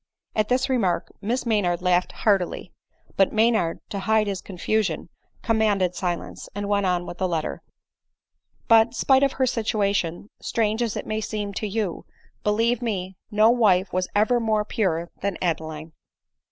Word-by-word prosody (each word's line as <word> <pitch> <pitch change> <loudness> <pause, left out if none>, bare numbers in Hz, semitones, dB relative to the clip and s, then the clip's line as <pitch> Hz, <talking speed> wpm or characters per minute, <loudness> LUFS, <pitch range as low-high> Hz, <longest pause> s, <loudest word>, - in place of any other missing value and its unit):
At 215 -1 +1
this 255 +1 +2
remark 205 -10 0
Miss 240 +5 -1
Maynard 185 -6 +1
laughed 180 0 +2
heartily; 195 -5 0 0.4
but 195 - +4
Maynard, 220 -6 +2
to 200 - -2
hide 215 +2 +2
his 200 -2 -3
confusion, 205 +3 -1 0.3
commanded 210 -5 +2
silence, 175 -2 -4
and 205 0 -3
went 200 -1 +1
on 175 -1 0
with 175 - -8
the 185 - +1
letter: 165 -3 -2 0.5
" - - -45
But, 230 +1 +5
spite 265 +1 +4
of 275 -1 +2
her 260 - +1
situation, 205 -6 -1
strange 220 0 0
as 230 -3 -1
it - - -4
may 215 0 -2
seem 210 -2 -4
to 215 - -3
you, 205 -3 -3 0.4
believe 225 +3 +1
me, 190 -5 -3
no 215 +2 +5
wife 200 -6 +3
was 185 0 0
ever 220 +4 +3
more 215 -2 +1
pure 170 -6 -1
than 200 -1 -1
Adeline." 160 -2 -3
205 Hz, 160 wpm, -24 LUFS, 180-220 Hz, 0.5 s, But